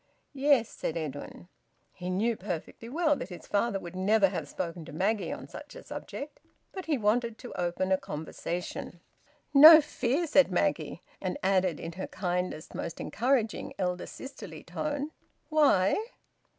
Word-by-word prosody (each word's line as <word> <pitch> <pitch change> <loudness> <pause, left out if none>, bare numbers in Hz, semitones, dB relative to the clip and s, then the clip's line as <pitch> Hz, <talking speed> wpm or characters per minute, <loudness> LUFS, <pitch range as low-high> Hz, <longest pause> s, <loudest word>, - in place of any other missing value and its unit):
"Yes," 275 -4 +3
said 165 - -4
Edwin. 155 +2 -6 0.5
He 180 0 -6
knew 220 +6 +1
perfectly 195 +4 -6
well 310 +2 +2
that 175 - -6
his 180 - -9
father 205 0 0
would 175 -1 -9
never 195 +1 +4
have 165 -6 -4
spoken 170 -2 -4
to - - -10
Maggie 200 +7 0
on - - -6
such - - -10
a - - -10
subject. 290 +1 -7 0.3
But 375 -2 -6
he 305 -3 +1
wanted 230 +1 +1
to 245 - -9
open 180 +2 -1
a 190 - +4
conversation. 170 +3 -5 0.5
"No 310 +3 +11
fear!" 290 +1 0
said 285 -3 +4
Maggie. - - 0 0.2
And - - -2
added 185 -4 +2
in 165 - -5
her 185 +3 -5
kindest, 180 -3 -3
most 165 - -5
encouraging, 230 0 0
elder 180 -1 -2
sisterly 270 +1 -9
tone: 290 0 -3 0.4
"Why?" 275 - +4
200 Hz, 150 wpm, -29 LUFS, 180-275 Hz, 0.5 s, No